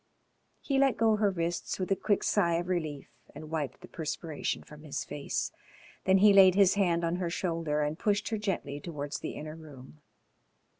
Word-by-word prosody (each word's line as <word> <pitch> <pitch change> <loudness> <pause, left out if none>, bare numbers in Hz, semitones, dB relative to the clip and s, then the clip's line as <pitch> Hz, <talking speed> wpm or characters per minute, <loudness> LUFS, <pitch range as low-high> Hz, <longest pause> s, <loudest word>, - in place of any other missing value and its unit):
He 275 -2 0
let 270 -2 +3
go 220 -1 +3
her 210 -1 +3
wrists 170 -2 -2
with 185 0 -3
a - - +5
quick 205 +1 0
sigh 170 -5 +2
of 175 +2 -2
relief 155 -6 -2 0.3
and 155 +1 -9
wiped 155 -2 -3
the 180 - -11
perspiration 160 -2 -4
from 150 0 -13
his 150 -2 -4
face. 145 - -3 0.5
Then 190 0 +5
he 205 +1 +6
laid 190 -2 +7
his 195 -2 +5
hand 175 -4 +1
on 170 +1 0
her 180 -2 -2
shoulder 165 -4 -1
and 150 +2 -3
pushed 205 0 0
her 220 -2 -2
gently 190 -8 -3
towards 145 -3 -5
the - - -5
inner 155 +1 -7
room. 150 -2 -13
170 Hz, 190 wpm, -30 LUFS, 155-195 Hz, 0.5 s, laid